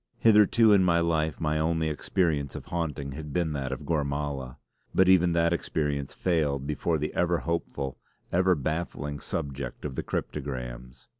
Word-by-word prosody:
Hitherto 110 0 +6
in 95 -2 +5
my 85 -2 +4
life 80 -2 0
my 75 -1 0
only 80 0 +1
experience 75 -2 0
of - - -7
haunting 75 -5 -3
had 75 +1 -7
been 85 -1 0
that 70 -2 -3
of 65 +2 -5
Gormala; 70 -4 -2 0.4
but 95 - +5
even 90 -2 +5
that 85 0 +3
experience 75 -4 -1
failed 75 -6 0
before 75 +3 0
the 75 +1 -3
ever 85 0 +2
hopeful, 75 -5 -3 0.3
ever 90 +1 +3
baffling 75 -1 -3
subject 70 -5 -5
of 70 - -3
the - - -2
cryptograms. 60 -4 -5
75 Hz, 155 wpm, -28 LUFS, 70-85 Hz, 0.4 s, Hitherto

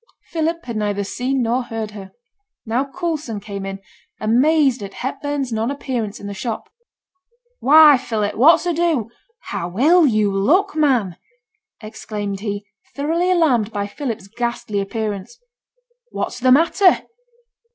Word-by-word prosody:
Philip 330 +1 -1
had 235 -3 -4
neither 205 -1 -1
seen 255 +5 -1
nor 240 +3 +1
heard 225 -3 -5
her. 200 -2 -10 0.5
Now 240 +4 0
Coulson 310 - -3
came 200 -1 -6
in, 195 0 -5 0.4
amazed 265 +3 +3
at 200 -1 -8
Hepburn's 275 0 -3
non 225 +2 -1
appearance 245 -7 -4
in - - -10
the 200 - -5
shop. 220 +3 -5 0.9
'Why! 300 -1 +7
Philip, 215 -4 -2
what's 325 +8 +5
ado? 330 -9 0 0.3
How 180 -4 -5
ill 320 +5 +5
yo' 215 -4 +2
look, 300 - +2
man!' 250 - +1 0.6
exclaimed 210 -2 -5
he, 205 -1 -4 0.3
thoroughly 330 +5 0
alarmed 270 - +2
by 205 -1 -2
Philip's 220 -2 -5
ghastly 230 -2 -3
appearance. 210 - -4 0.7
'What's - - -4
the 255 +1 +3
matter?' 340 +7 +4
240 Hz, 130 wpm, -20 LUFS, 210-295 Hz, 0.9 s, Why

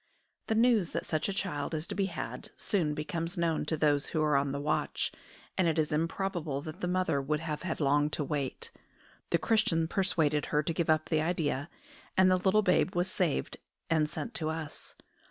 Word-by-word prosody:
The 220 - +1
news 225 -6 +4
that - - -2
such 155 +3 0
a - - 0
child 165 -6 -2
is 155 +1 -2
to - - -5
be 195 -1 0
had 185 +4 -5
soon 160 -7 0
becomes 165 +4 -3
known 165 -3 +1
to 160 +1 -1
those 145 -2 +2
who 160 - -1
are 150 -2 +3
on 140 0 +2
the 140 - -2
watch, 150 +1 0 0.4
and 185 -3 +2
it 165 0 +1
is 155 -1 +1
improbable 165 -2 -1
that 160 +5 -8
the 180 - 0
mother 180 -6 +1
would 150 +3 -1
have 155 -2 -3
had 175 -4 -3
long 145 0 +3
to 150 - 0
wait. 140 -2 -3 0.6
The 170 - +3
Christian 195 -6 +2
persuaded 160 -6 +1
her 150 0 +1
to 165 - -1
give 165 0 -1
up 155 0 +2
the 155 -2 +2
idea, 155 -3 -1 0.5
and 185 0 +6
the 185 - +5
little 195 +3 +3
babe 185 0 +2
was 180 +1 +1
saved 175 -6 0 0.3
and 155 -2 +3
sent 230 +8 -5
to 160 -7 -1
us. 160 -2 -6
160 Hz, 205 wpm, -31 LUFS, 150-185 Hz, 0.6 s, and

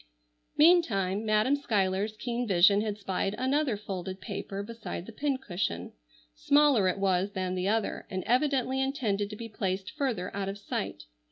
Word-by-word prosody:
Meantime 225 - +4
Madam 215 +5 +3
Schuyler's 210 -5 0
keen 240 +1 -2
vision 200 +2 +5
had 210 -1 -2
spied 195 0 -2
another 260 -2 +1
folded 190 -2 -5
paper 200 -1 -5
beside 230 -5 -6
the 230 - -9
pincushion. 210 - -2 0.4
Smaller 280 - +4
it 185 - 0
was 195 0 +1
than 185 -1 -2
the 185 +1 -1
other, 220 +1 -1
and 185 -2 -3
evidently 265 0 +1
intended 220 -7 -1
to 210 - -6
be 230 +2 -7
placed 190 -3 -3
further 255 - -2
out 195 -1 -2
of 195 - -5
sight. 200 - -4
210 Hz, 155 wpm, -29 LUFS, 190-255 Hz, 0.4 s, vision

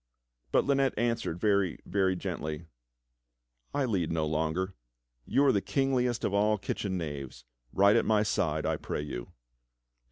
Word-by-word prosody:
But - - +3
Lynette 135 -2 +2
answered 115 -7 -1
very, 100 -3 +2
very 95 -2 +1
gently: 85 -3 -4 1.1
"I 140 -2 0
lead 95 -9 0
no 80 -1 0
longer. 80 +5 -1 0.5
You 140 - +3
are 135 - +6
the 100 - +1
kingliest 125 -3 0
of 100 - 0
all 105 +1 +3
kitchen 95 -1 -3
knaves. 70 -7 -6 0.3
Ride 100 +2 +5
at - - +3
my 105 -1 +3
side, 80 -7 0
I - - 0
pray 75 - -4
you." - - -6
95 Hz, 150 wpm, -30 LUFS, 80-110 Hz, 1.1 s, are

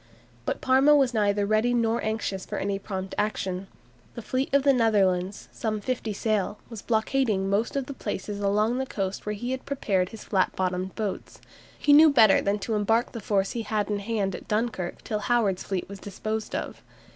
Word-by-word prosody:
But - - -2
Parma 270 +3 +5
was 270 -4 +3
neither 205 -2 +2
ready 215 +4 +2
nor 230 0 +1
anxious 215 -3 -2
for - - -5
any 195 0 -1
prompt 190 -1 -5
action. 195 -3 -2 0.5
The 235 - -7
fleet 260 +4 -1
of 280 -1 +3
the 275 -1 +5
Netherlanders, 200 -5 +1
some 215 -2 -2
fifty 230 0 -3
sail, 210 -1 -1
was 225 -3 -7
blockading 220 -3 +1
most 215 +6 0
of 275 -2 -1
the 280 - -6
places 205 -5 -5
along 210 +5 +1
the 265 - -2
coast 195 -2 -4
where 210 - -1
he 240 +5 -4
had 260 0 -3
prepared 195 -10 0
his 225 - -10
flat 190 -3 0
bottomed 185 0 -2
boats. 210 -3 -4 0.4
He 290 - +4
knew 310 +2 +9
better 225 -8 +6
than 200 +1 0
to 225 - -2
embark 225 +3 +1
the 230 - -6
force 195 -1 0
he 235 - -3
had 210 -2 -1
in 205 - 0
hand 200 -2 -1
at - - -8
Dunkirk 210 -5 -2
till 215 -3 -2
Howard's 210 -4 +1
fleet 190 -2 -3
was 200 0 -9
disposed 215 +2 -4
of. - - -5
215 Hz, 195 wpm, -26 LUFS, 195-235 Hz, 0.5 s, knew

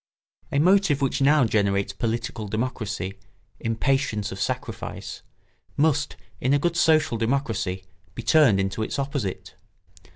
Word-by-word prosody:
A - - 0
motive 180 -2 +4
which 135 0 0
now 145 -1 +5
generates 100 -2 +1
political 115 0 -3
democracy, 110 -3 -3 0.4
impatience 115 -2 0
of 95 - -6
sacrifice, - - -4 0.6
must, 145 -2 +2 0.2
in 130 +2 +2
a - - +5
good 170 +4 0
social 155 -8 +3
democracy, 115 -7 -1 0.3
be - - -6
turned 145 -11 +5
into 95 +3 -1
its 110 - -2
opposite. 135 -8 -3
120 Hz, 125 wpm, -25 LUFS, 105-145 Hz, 0.6 s, now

